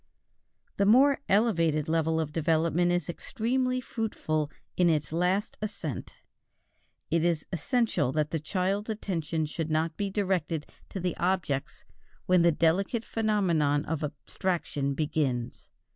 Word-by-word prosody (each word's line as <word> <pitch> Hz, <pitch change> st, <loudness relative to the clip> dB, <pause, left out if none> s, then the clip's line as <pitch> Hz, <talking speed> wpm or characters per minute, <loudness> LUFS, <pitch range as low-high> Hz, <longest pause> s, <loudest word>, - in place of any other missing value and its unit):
This 200 Hz, -, +3 dB
more 270 Hz, +6 st, +6 dB
elevated 165 Hz, -8 st, +2 dB
level 160 Hz, 0 st, +1 dB
of 155 Hz, -2 st, -2 dB
development 165 Hz, +2 st, +2 dB
is 175 Hz, 0 st, 0 dB
extremely 255 Hz, +7 st, -1 dB
fruitful 160 Hz, -11 st, -2 dB, 0.3 s
in 180 Hz, -1 st, +4 dB
its 150 Hz, -2 st, 0 dB
last 180 Hz, +4 st, 0 dB
ascent 200 Hz, -, -5 dB, 1.0 s
It 165 Hz, 0 st, +2 dB
is 170 Hz, -3 st, +1 dB
essential 210 Hz, -, +1 dB
that 150 Hz, 0 st, 0 dB
the 160 Hz, -, 0 dB
child's 190 Hz, +6 st, -1 dB
attention 165 Hz, -7 st, -2 dB
should 160 Hz, +1 st, -4 dB
not 155 Hz, +1 st, 0 dB
be 200 Hz, -1 st, -1 dB
directed 185 Hz, -6 st, -1 dB, 0.2 s
to 195 Hz, -, -5 dB
the 180 Hz, -1 st, -1 dB
objects 175 Hz, -7 st, -1 dB, 0.4 s
when 185 Hz, -1 st, +4 dB
the 170 Hz, 0 st, +5 dB
delicate 190 Hz, +8 st, +1 dB
phenomenon 170 Hz, -10 st, +1 dB
of 160 Hz, 0 st, -2 dB
abstraction 145 Hz, -1 st, -2 dB
begins. 140 Hz, -6 st, -2 dB
170 Hz, 130 wpm, -28 LUFS, 155-200 Hz, 1.0 s, more